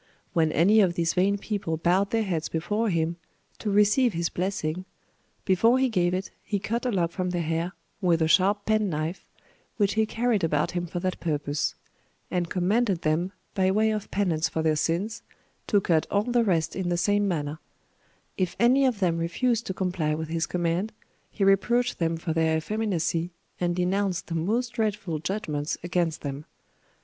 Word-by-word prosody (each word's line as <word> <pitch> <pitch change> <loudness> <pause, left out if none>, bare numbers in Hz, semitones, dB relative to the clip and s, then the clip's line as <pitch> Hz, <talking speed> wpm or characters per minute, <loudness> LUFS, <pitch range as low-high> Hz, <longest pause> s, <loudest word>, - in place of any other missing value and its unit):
When 160 -2 +2
any 200 +7 +4
of 180 -3 +2
these 170 -1 +1
vain 195 +2 +2
people 200 -6 -3
bowed 180 +4 +2
their 225 +1 +1
heads 170 -6 -2
before 210 +7 -1
him, 170 -1 0 0.4
to 215 - -2
receive 210 +4 +4
his 170 0 -1
blessing, 185 -2 -2 0.6
before 225 +6 +4
he 260 0 +2
gave 180 -4 +1
it 185 +1 -4
he 205 - -1
cut 230 +5 -2
a - - +1
lock 175 -5 0
from 185 0 -2
their 175 -1 -1
hair, 165 +2 -1 0.3
with 175 -3 +3
a - - +2
sharp 200 +4 +3
penknife, 185 -6 0 0.5
which 205 -3 +2
he 220 0 +2
carried 230 -3 0
about 150 -2 +1
him 175 -1 -2
for 175 +1 -4
that 185 0 -2
purpose; 145 -3 -1 0.6
and 175 -2 -1
commanded 190 +1 +1
them, 160 +4 +1 0.2
by 190 -2 +2
way 215 +3 +3
of 215 -2 -3
penance 170 -5 0
for 160 - -2
their 155 -1 +3
sins, 175 +9 -1 0.5
to 205 - +4
cut 165 -4 +1
all 200 0 +2
the 240 0 +2
rest 170 -7 0
in 185 -2 -2
the 175 - +1
same 205 +3 +2
manner: 155 -4 -2 0.8
if 185 -2 -1
any 260 +3 +5
of 230 -6 -1
them 170 -3 +2
refused 235 +8 0
to 190 - -2
comply 175 -5 -1
with 160 0 -5
his 165 0 -1
command 175 +4 -1 0.4
he 200 - -2
reproached 235 +6 +2
them 165 -1 0
for 165 0 -3
their 160 -1 +2
effeminacy, 170 -3 -1 0.3
and 175 -1 0
denounced 185 0 0
the 170 - -6
most 215 +10 0
dreadful 210 -8 -2
judgments 155 -5 -2
against 175 -2 -1
them. 140 +1 -5
180 Hz, 180 wpm, -26 LUFS, 165-210 Hz, 0.8 s, any